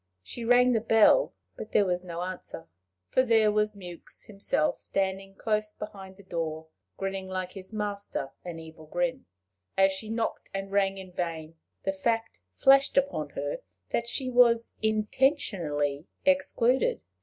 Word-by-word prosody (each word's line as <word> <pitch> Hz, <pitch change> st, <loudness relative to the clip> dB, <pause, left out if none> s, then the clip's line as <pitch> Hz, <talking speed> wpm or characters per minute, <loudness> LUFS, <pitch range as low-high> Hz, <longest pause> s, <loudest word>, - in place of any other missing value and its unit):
She 235 Hz, -, -6 dB
rang 245 Hz, +2 st, +5 dB
the 225 Hz, -, +3 dB
bell, 225 Hz, -, +5 dB, 0.2 s
but 215 Hz, -, -8 dB
there 205 Hz, -, +5 dB
was 180 Hz, -1 st, -1 dB
no 175 Hz, -1 st, -4 dB
answer 185 Hz, 0 st, -6 dB, 0.4 s
for -, -, +4 dB
there 225 Hz, -4 st, +4 dB
was 210 Hz, 0 st, +1 dB
Mewks 180 Hz, -3 st, -9 dB
himself 195 Hz, -6 st, 0 dB
standing 195 Hz, 0 st, -2 dB
close 215 Hz, 0 st, -1 dB
behind 195 Hz, -3 st, -9 dB
the 200 Hz, -, -14 dB
door, 160 Hz, -3 st, -3 dB, 0.3 s
grinning 195 Hz, -1 st, -3 dB
like 185 Hz, -1 st, -3 dB
his 190 Hz, 0 st, -9 dB
master 205 Hz, -9 st, -3 dB
an 175 Hz, -2 st, -6 dB
evil 160 Hz, -1 st, -11 dB
grin. 260 Hz, -, -1 dB, 0.5 s
As 195 Hz, 0 st, +5 dB
she 190 Hz, +3 st, -5 dB
knocked 225 Hz, 0 st, -2 dB
and 195 Hz, 0 st, -4 dB
rang 195 Hz, -1 st, +2 dB
in 190 Hz, -1 st, -9 dB
vain, 165 Hz, -3 st, -4 dB, 0.3 s
the 195 Hz, -, +1 dB
fact 225 Hz, -, -1 dB, 0.2 s
flashed 275 Hz, +1 st, +5 dB
upon 275 Hz, +1 st, +1 dB
her -, -, -2 dB, 0.3 s
that 235 Hz, -, 0 dB
she 255 Hz, +2 st, -2 dB
was 240 Hz, -2 st, +4 dB
intentionally 210 Hz, -, +1 dB, 0.2 s
excluded. 275 Hz, -3 st, +3 dB
200 Hz, 150 wpm, -28 LUFS, 185-230 Hz, 0.5 s, rang